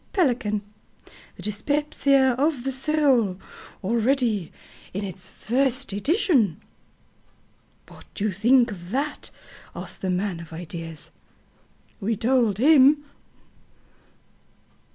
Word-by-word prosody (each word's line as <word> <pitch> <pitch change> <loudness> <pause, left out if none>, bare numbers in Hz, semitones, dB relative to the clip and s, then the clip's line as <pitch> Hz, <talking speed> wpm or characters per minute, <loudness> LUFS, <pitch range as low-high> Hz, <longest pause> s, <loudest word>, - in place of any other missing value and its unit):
Pelican 240 - +1 0.7
THE - - -11
DYSPEPSIA 275 +3 +2
OF 285 -3 +1
THE 270 - -1
SOUL 265 -8 +2 0.5
Already 230 - +1 0.4
in 200 - -2
its 185 -1 -6
first 260 +2 -1
edition. 255 - +2 1.3
"What - - -15
do 200 - -4
you 215 - +1
think 235 +5 +3
of 175 -3 -9
that?" 280 +6 -2 0.5
asked - - -6
the 190 - -2
man 180 -1 -1
of 165 -1 -11
ideas. 165 -1 -6 0.9
We 220 +2 -1
told 230 -3 +2
him. 290 +2 +6
235 Hz, 100 wpm, -24 LUFS, 195-275 Hz, 1.3 s, him